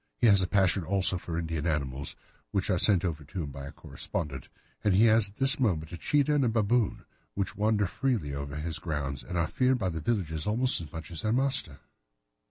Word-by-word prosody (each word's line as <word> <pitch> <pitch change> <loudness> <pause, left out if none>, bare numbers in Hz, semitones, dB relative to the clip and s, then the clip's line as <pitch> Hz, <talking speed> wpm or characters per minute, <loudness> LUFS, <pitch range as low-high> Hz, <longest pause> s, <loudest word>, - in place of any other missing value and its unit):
He - - +1
has 100 -4 +6
a 90 - 0
passion 95 -1 +2
also 95 +1 +2
for 85 -1 -5
Indian 80 -1 -2
animals, 70 -3 -2 0.3
which 100 +1 -1
are 90 - +1
sent 95 -3 +3
over 80 -3 -3
to 85 +4 -5
him 70 - -6
by 70 0 -8
a - - -8
correspondent, 70 -5 -5 0.4
and 105 -3 +3
he 105 - +5
has 110 -2 +4
at 100 - -19
this 135 +3 +4
moment 85 -10 0
a 85 - -6
cheetah 145 0 +2
and 145 -2 +2
a 120 - +2
baboon, 115 0 +1 0.3
which 100 -1 -2
wander 105 0 +1
freely 105 - -1
over 70 0 -5
his 75 +1 -3
grounds 75 -5 -3
and 90 - -5
are 85 - +2
feared 130 +9 +1
by 95 -6 -1
the 80 -2 -4
villagers 80 -5 -1
almost 120 0 +2
as 75 -3 -9
much 80 0 -8
as 85 - -4
their 110 - 0
master. 130 - +1
90 Hz, 220 wpm, -29 LUFS, 80-110 Hz, 0.4 s, has